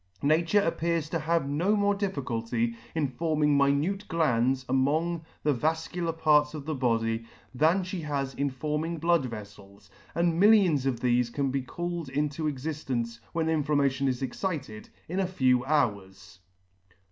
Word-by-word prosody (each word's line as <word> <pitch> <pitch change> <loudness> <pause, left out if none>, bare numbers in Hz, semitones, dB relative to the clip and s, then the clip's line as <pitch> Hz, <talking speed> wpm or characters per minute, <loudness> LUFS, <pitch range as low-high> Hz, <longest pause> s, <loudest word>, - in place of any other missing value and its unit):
Nature 165 +7 +3
appears 165 -3 0
to 165 - -1
have 165 -1 0
no 170 +9 +1
more 205 0 +2
difficulty 120 - -2 0.2
in 155 -3 +1
forming 150 +2 +1
minute 145 +9 +1
glands 130 -5 +1
among 155 +6 +1 0.2
the 150 - +3
vafcular 160 +5 -1
parts 150 -2 +3
of 145 -2 -7
the 155 - -2
body, 115 -4 0 0.3
than 160 +8 +3
fhe 185 -1 -5
has 140 -3 -2
in 140 +2 -1
forming 150 +5 -3
blood 165 -4 +2
veffels, 100 -2 -11 0.2
and 170 0 +1
millions 190 -10 +5
of 120 -3 -1
thefe 120 -1 +2
can 135 +1 -1
be 135 0 -1
called 170 +3 -5
into 150 +3 -1
exidence, 130 -5 -3
when 165 -1 -1
indammation 145 -3 +1
is 130 0 -1
excited, 135 - -4 0.2
in 180 +4 -2
a 190 - +1
few 130 -8 +2
hours*. 100 -11 -1
150 Hz, 145 wpm, -28 LUFS, 130-165 Hz, 0.3 s, millions